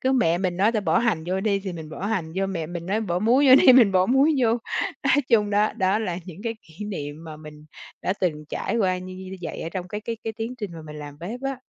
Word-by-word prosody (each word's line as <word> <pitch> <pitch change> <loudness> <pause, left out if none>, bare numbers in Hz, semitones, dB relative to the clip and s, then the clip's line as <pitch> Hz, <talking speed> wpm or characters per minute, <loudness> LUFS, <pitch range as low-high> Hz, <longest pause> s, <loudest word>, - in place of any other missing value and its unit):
Cứ 260 +1 +1
mẹ 175 -10 +3
mình 185 -2 -1
nói 205 +4 +3
ta: 215 - +1
"Bỏ 165 -5 +2
hành 210 -10 0
vô 190 +1 -1
đi" 200 -1 +1
thì 190 -2 -5
mình 160 -2 -8
bỏ 190 +5 -5
hành 175 -7 -2
vô, 195 0 +1
mẹ 170 -5 -3
mình 170 0 -6
nói: 205 +4 0
"Bỏ 180 -5 -1
muối 250 +7 +4
vô 260 - +10
đi" 260 - +8
mình 235 -6 +6
bỏ 185 0 +4
muối 270 +5 +4
vô. 235 - +4 0.6
Nói - - +4
chung 210 -4 +3
đó, 210 +1 +2
đó 195 -1 +1
là 180 -5 -2
những 180 +3 -10
cái 230 0 -1
kỷ 165 +6 -10
niệm 155 -5 -6
mà 155 -1 -8
mình 150 -1 -12 0.4
đã 185 - +1
từng 155 -5 -1
trải 230 - -2
qua 185 -4 +1
như 185 0 -8
như 190 0 -9
như 190 +1 -7
vậy 160 - -5
ở 165 - -4
trong 180 0 -5
cái 210 +1 -4
cái 230 +1 -4
cái 225 - -2
tiến 225 +3 -5
trình 205 -5 -5
mà 165 -1 -9
mình 150 0 -9
làm 145 -1 -9
bếp 215 +9 -6
á. 270 -1 -2
190 Hz, 285 wpm, -24 LUFS, 170-220 Hz, 0.6 s, vô